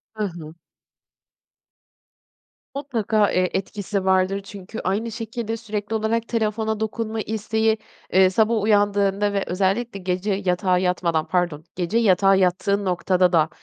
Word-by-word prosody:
Hı 215 - -2
hı. 165 -5 -6 2.2
Mutlaka, 220 -7 +1
eee, 185 0 +1
etkisi 195 0 -3
vardır 190 +1 +2
çünkü 200 +2 -9
aynı 215 +5 -1
şekilde 225 0 -4
sürekli 215 -1 -4
olarak 225 +1 0
telefona 220 -1 -1
dokunma 220 0 -3
isteği, 220 +1 0 0.4
eee, 190 0 +6
sabah 220 +2 +2
uyandığında 205 -1 +2
ve 200 - 0
özellikle 195 +4 -1
gece 185 +2 -1
yatağa 180 0 +2
yatmadan, 175 -3 0
pardon, 175 -4 -1
gece 180 +5 -1
yatağa 195 -3 +4
yattığın 190 +2 +1
noktada 180 0 +2
da, 160 0 +4
200 Hz, 125 wpm, -23 LUFS, 185-220 Hz, 2.2 s, eee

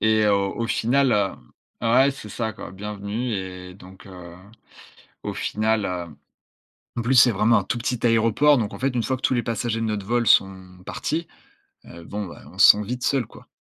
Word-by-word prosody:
Et 110 -1 +3
heu, 105 - +3
au 100 +3 -1
au - - -1
final, 130 +3 +1
heu 100 -2 0 0.5
ouais, 135 +4 +5
c'est 135 -6 -10
ça 110 +1 -3
quoi. - - -9
Bienvenue 105 +4 -5
et 90 -1 -7
donc 95 +1 -15
heu, 90 -2 -11 0.9
au - - -4
final, 110 0 -1
heu, 85 -4 -5 0.8
en - - 0
plus, 125 +3 +1
c'est 120 -1 +7
vraiment 110 +3 +3
un - - -4
tout 120 - -3
petit 120 0 -2
aéroport 115 +6 +4
donc 110 -4 -2
en - - -8
fait, 135 +1 +1
une 120 - 0
fois 130 - -1
que - - -17
tous 130 - +1
les 120 - 0
passagers 115 0 -2
de - - -1
notre 105 -3 -3
vol 120 0 0
sont 95 -1 +2
partis, 165 +2 -3 0.6
heu, 85 0 -12
bon, 105 +3 -5
ben, 85 - -12
on - - -16
se - - +9
sent 105 - -4
vite 125 +4 -5
seuls, 135 -5 +1
quoi. - - -16
110 Hz, 210 wpm, -23 LUFS, 95-120 Hz, 0.9 s, se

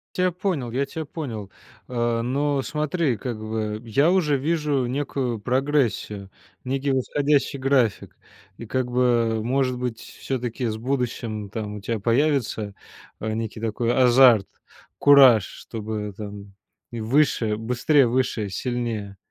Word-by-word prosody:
Тя 180 0 +2
понял, 175 -9 -2
я 135 +3 0
тя 160 +2 -6
понял, 115 - -6 0.4
а, 120 -2 0
но 140 +3 0
смотри, 150 -3 -1
как 120 +1 -5
бы, 110 0 -3
я 140 +9 +2
уже 155 -7 +2
вижу 150 -3 0
некую 130 -2 -2
прогрессию, 120 -5 0 0.3
некий 135 +1 -1
восходящий 140 +2 +1
график. 130 -5 +1 0.4
И 115 - -8
как 125 0 -1
бы, 120 -3 +2
может 130 0 0
быть, 125 -3 -3
все-таки 125 -2 -4
с 110 - -3
будущим 115 -4 -3
там 105 -1 -5
у 100 - -9
тя 115 +2 -2
появится, 115 -4 0 0.4
э, 110 0 -3
некий 110 0 -4
такой 115 +1 -1
азарт, 125 -4 +6 0.5
кураж, 135 -7 +7
чтобы, 105 -2 -6
там, 100 -1 -8 0.4
и 115 - -5
выше 115 -3 +2
быстрее, 125 +5 +2
выше, 115 -4 0
сильнее. 115 -3 -3
120 Hz, 130 wpm, -24 LUFS, 110-140 Hz, 0.5 s, кураж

